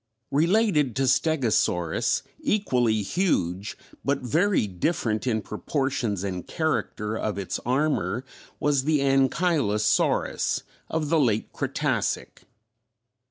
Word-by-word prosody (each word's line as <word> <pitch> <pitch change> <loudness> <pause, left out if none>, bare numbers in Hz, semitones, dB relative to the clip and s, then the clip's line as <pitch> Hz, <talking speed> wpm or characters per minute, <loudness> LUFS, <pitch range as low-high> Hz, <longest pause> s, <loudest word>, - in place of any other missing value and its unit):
Related 165 - +2
to 135 - +1
Stegosaurus, 125 - +1 0.2
equally 125 - +1
huge, 100 - -1 0.3
but 140 -1 0
very 165 - +2
different 110 - -1
in 110 -3 0
proportions 120 - -2
and 90 -3 -4
character 110 -8 -1
of 110 -3 -2
its 100 -2 -3
armor 135 -1 0 0.3
was 140 -2 +1
the 155 -2 +2
Ankylosaurus 135 - +1 0.3
of 155 -2 -1
the 165 0 +3
late 110 -6 +1
Cretacic. - - -2
130 Hz, 100 wpm, -25 LUFS, 105-155 Hz, 0.3 s, the